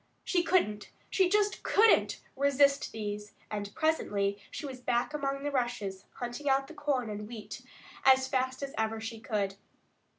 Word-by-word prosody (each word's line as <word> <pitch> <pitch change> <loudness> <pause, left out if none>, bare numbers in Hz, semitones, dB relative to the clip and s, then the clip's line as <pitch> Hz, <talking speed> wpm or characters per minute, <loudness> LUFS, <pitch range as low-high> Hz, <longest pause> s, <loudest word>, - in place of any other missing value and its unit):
She 355 - +2
couldn't, 325 - +1 0.2
she 375 -2 +3
just 415 +1 +2
couldn't 445 +2 +4
resist 280 0 +3
these, 210 -1 -5 0.2
and 205 -1 -3
presently 205 -11 +1
she 310 - -6
was 260 -2 -7
back 245 +3 0
among 275 -1 -2
the 290 - -1
rushes, 240 -7 -2
hunting 245 +4 -3
out 270 0 +3
the 320 - -11
corn 290 -5 -1
and 210 0 -5
wheat 225 -2 -8 0.4
as 265 0 +6
fast 260 0 -1
as 275 - -4
ever 220 0 0
she 225 0 -6
could. 205 -3 -2
255 Hz, 160 wpm, -31 LUFS, 215-285 Hz, 0.4 s, as